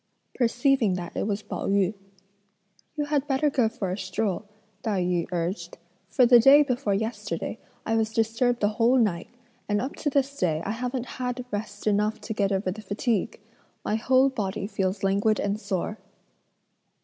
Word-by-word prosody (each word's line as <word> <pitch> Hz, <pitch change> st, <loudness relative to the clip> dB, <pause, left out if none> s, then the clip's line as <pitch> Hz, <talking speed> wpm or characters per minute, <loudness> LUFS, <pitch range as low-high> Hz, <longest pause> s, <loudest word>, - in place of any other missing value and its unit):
Perceiving 245 Hz, -3 st, +2 dB
that 175 Hz, -1 st, -6 dB
it -, -, -1 dB
was 210 Hz, 0 st, -2 dB
Pao -, -, -4 dB
yü, 195 Hz, 0 st, +2 dB, 1.0 s
"You 295 Hz, -, 0 dB
had 290 Hz, -1 st, 0 dB
better 285 Hz, +1 st, +2 dB
go 245 Hz, -5 st, +2 dB
for 195 Hz, -5 st, -4 dB
a 185 Hz, -, -2 dB
stroll," 190 Hz, +2 st, -2 dB, 0.4 s
Tai 205 Hz, -5 st, 0 dB
yü 175 Hz, -1 st, 0 dB
urged, 175 Hz, 0 st, -3 dB, 0.3 s
"for 250 Hz, -, +4 dB
the 240 Hz, 0 st, +8 dB
day 275 Hz, +5 st, +8 dB
before 250 Hz, -7 st, 0 dB
yesterday 220 Hz, +4 st, -3 dB, 0.3 s
I 225 Hz, -, +1 dB
was 220 Hz, -1 st, +1 dB
disturbed 230 Hz, +2 st, +1 dB
the 205 Hz, -, +3 dB
whole 230 Hz, +4 st, +3 dB
night, 200 Hz, -5 st, +1 dB, 0.4 s
and 205 Hz, 0 st, +2 dB
up 265 Hz, +5 st, -4 dB
to 295 Hz, -, -1 dB
this 280 Hz, 0 st, 0 dB
day 165 Hz, -, 0 dB
I 200 Hz, -, -1 dB
haven't 250 Hz, +2 st, -3 dB, 0.2 s
had 250 Hz, 0 st, -2 dB
rest 205 Hz, 0 st, -5 dB
enough 210 Hz, +1 st, +1 dB
to -, -, -4 dB
get 200 Hz, -2 st, 0 dB
over 190 Hz, -1 st, 0 dB
the 215 Hz, -, -7 dB
fatigue. 210 Hz, +1 st, -1 dB, 0.5 s
My -, -, 0 dB
whole 255 Hz, +4 st, +4 dB
body 200 Hz, -6 st, -3 dB
feels 195 Hz, -1 st, -2 dB
languid 200 Hz, +2 st, +2 dB
and 205 Hz, +1 st, -1 dB
sore." 200 Hz, +2 st, -3 dB
220 Hz, 175 wpm, -26 LUFS, 195-250 Hz, 1.0 s, the